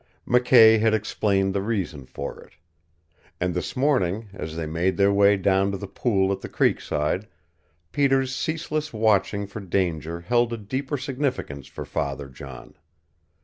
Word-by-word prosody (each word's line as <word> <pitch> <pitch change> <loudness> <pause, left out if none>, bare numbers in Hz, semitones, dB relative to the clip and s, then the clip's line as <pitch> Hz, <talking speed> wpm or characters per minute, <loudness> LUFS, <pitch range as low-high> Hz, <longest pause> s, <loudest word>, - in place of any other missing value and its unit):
McKay 120 -2 +6
had 110 0 +3
explained 100 -2 0
the 100 - 0
reason 95 - -3
for - - -6
it. - - -18 0.9
And 90 0 0
this 90 - -4
morning, 110 -7 +1
as 80 -4 -6
they 80 -1 -3
made 85 +4 0
their 100 0 +4
way 100 0 +5
down 95 +1 +2
to 100 - -3
the 100 - -6
pool 100 -1 0
at 100 - -3
the - - -7
creekside, 80 +8 0 0.6
Peter's 135 -2 +2
ceaseless 155 -1 -2
watching 100 -2 +2
for 100 +2 -8
danger 85 -4 -2
held 120 +6 +1
a - - -3
deeper 130 +7 -3
significance 130 - -3
for - - -8
Father 70 -1 -3
John. 65 0 -11
100 Hz, 150 wpm, -24 LUFS, 90-120 Hz, 0.9 s, McKay